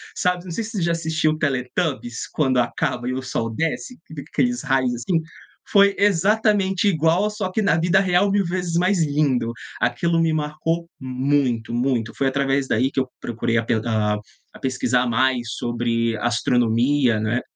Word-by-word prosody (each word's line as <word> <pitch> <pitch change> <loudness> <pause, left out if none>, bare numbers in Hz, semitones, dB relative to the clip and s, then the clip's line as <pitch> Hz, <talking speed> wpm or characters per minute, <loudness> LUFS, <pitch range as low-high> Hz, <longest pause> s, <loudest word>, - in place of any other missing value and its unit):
sabe. 180 -1 0
Eu - - -17
não 180 - -7
sei 225 - -2
se 225 - -7
você 200 -6 -3
já 170 - +1
assistiu 160 -1 0
o 155 - -3
Teletubes, 130 -2 -2
quando 130 -4 +1
acaba 120 +1 -1
e - - -1
o 130 - -3
sol 120 -3 -3
desce, 165 - -3
fica 150 -3 -8
aqueles 245 -1 0
raios 130 -3 +1
assim. 160 +8 -1 0.5
Foi 200 -1 +5
exatamente 200 0 +2
igual, 170 +4 +2
só 210 -3 -4
que 220 - 0
na 180 -6 +2
vida 175 +3 +3
real, 190 +1 +2
1000 200 -1 +2
vezes 175 -1 -2
mais 180 0 +2
lindo. 140 -5 +1 0.3
Aquilo 170 -1 +1
me 165 -1 +2
marcou 155 +2 -2
muito, 130 -3 0
muito. 120 -2 0
Foi 140 - -1
através 135 0 0
daí 125 +4 +1
que - - -1
eu 130 - 0
procurei 115 0 -1
a 115 - 0 0.9
a - - -13
pesquisar 130 -1 0
mais 120 0 +1
sobre 115 -1 -1
astronomia, 120 +1 +2
né, 110 +3 0
145 Hz, 170 wpm, -22 LUFS, 125-175 Hz, 0.9 s, Foi